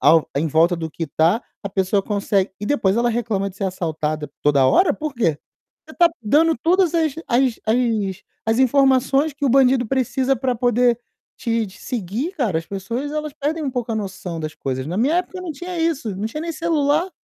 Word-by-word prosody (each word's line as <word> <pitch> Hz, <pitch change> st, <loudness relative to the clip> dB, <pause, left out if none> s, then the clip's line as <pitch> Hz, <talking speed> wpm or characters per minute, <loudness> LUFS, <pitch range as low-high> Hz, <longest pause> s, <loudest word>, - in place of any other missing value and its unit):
ao 160 Hz, -1 st, +5 dB
em 150 Hz, +3 st, +1 dB
volta 165 Hz, +3 st, +3 dB
do 160 Hz, -1 st, -4 dB
que 165 Hz, +1 st, -4 dB
tá. 165 Hz, -, +2 dB, 0.2 s
A -, -, -2 dB
pessoa 190 Hz, +1 st, +1 dB
conse 200 Hz, -1 st, 0 dB
e 205 Hz, -, -3 dB
depois 205 Hz, -7 st, +1 dB
ela 240 Hz, +1 st, +2 dB
reclama 220 Hz, -4 st, -1 dB
de 185 Hz, -, -18 dB
ser 200 Hz, -, -3 dB
assaltada 155 Hz, -5 st, -3 dB
toda 140 Hz, -2 st, +3 dB
hora, 300 Hz, -, +4 dB
por 305 Hz, -1 st, -4 dB
quê? 195 Hz, -, +1 dB, 0.5 s
Você -, -, -13 dB
tá 345 Hz, -1 st, +6 dB
dando 310 Hz, +9 st, +3 dB
todas 345 Hz, +5 st, +2 dB
as 320 Hz, -3 st, +2 dB
as 250 Hz, -1 st, +2 dB
as 220 Hz, -4 st, 0 dB, 0.2 s
as 225 Hz, +1 st, +2 dB
informações 270 Hz, +2 st, +3 dB
que 290 Hz, +1 st, -5 dB
o -, -, +3 dB
bandido 255 Hz, -1 st, +4 dB
precisa 265 Hz, +2 st, 0 dB
pra 255 Hz, +1 st, -1 dB
poder 245 Hz, 0 st, +2 dB, 0.4 s
te 230 Hz, -3 st, -1 dB
te 190 Hz, -, -14 dB
seguir, 240 Hz, -, -3 dB
cara. 225 Hz, -, 0 dB
As 165 Hz, -, -7 dB
pessoas, 230 Hz, +9 st, -4 dB
elas 305 Hz, -1 st, -3 dB
perdem 310 Hz, +2 st, -2 dB
um 275 Hz, -, -1 dB
pouco 245 Hz, -2 st, -3 dB
a -, -, -1 dB
noção 190 Hz, -5 st, -5 dB
das 155 Hz, 0 st, -5 dB
coisas. 130 Hz, 0 st, -4 dB
Na 170 Hz, +4 st, -3 dB
minha 270 Hz, -, +2 dB
época 365 Hz, +1 st, -2 dB
não 365 Hz, -2 st, -5 dB
tinha 350 Hz, +4 st, -6 dB
isso, 310 Hz, -, -1 dB
não 205 Hz, +3 st, -2 dB
tinha 265 Hz, +7 st, -5 dB
nem 335 Hz, +1 st, -3 dB
celular. 320 Hz, +1 st, +1 dB
235 Hz, 205 wpm, -21 LUFS, 190-285 Hz, 0.5 s, tá